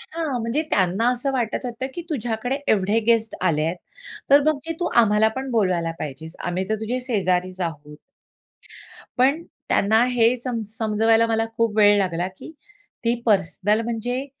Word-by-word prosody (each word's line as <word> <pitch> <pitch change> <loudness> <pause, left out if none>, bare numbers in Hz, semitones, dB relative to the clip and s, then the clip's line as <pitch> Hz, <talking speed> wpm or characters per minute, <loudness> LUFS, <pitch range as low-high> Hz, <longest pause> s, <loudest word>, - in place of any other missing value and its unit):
हां, 315 -6 -4
म्हणजे 230 +7 -1
त्यांना 195 +4 +1
असं 270 +3 -2
वाटत 245 0 -2
होतं 245 +2 -4
की 345 - -5
तुझ्याकडे 245 -1 -2 0.2
एवढे 205 +2 +2
गेस्ट 225 -1 +2
आलेत, 165 +1 +1 0.5
तर 285 +1 +8
मग 310 -2 +2
जे 330 - -3
तू 350 - 0
आम्हाला 215 -1 +3
पण 265 0 -4
बोलवायला 185 -7 +1
पाहिजेस, 155 +3 -7
आम्ही 180 +2 -2
तर 220 - +1
तुझे 245 +4 -2
शेजारीच 185 -4 0
आहोत. 150 -3 -5 1.2
पण 280 +6 +2 0.3
त्यांना 220 +4 +3
हे 240 0 +3
समज 235 -4 -4
समजवायला 225 0 +3
मला 225 0 +1
खूप 225 -2 0
वेळ 205 -1 +6
लागला 180 -2 0
की - - -10 0.5
ती 235 - +3
पर्सनल 205 +1 +2
म्हणजे 235 +3 -3
225 Hz, 155 wpm, -22 LUFS, 185-245 Hz, 1.2 s, तर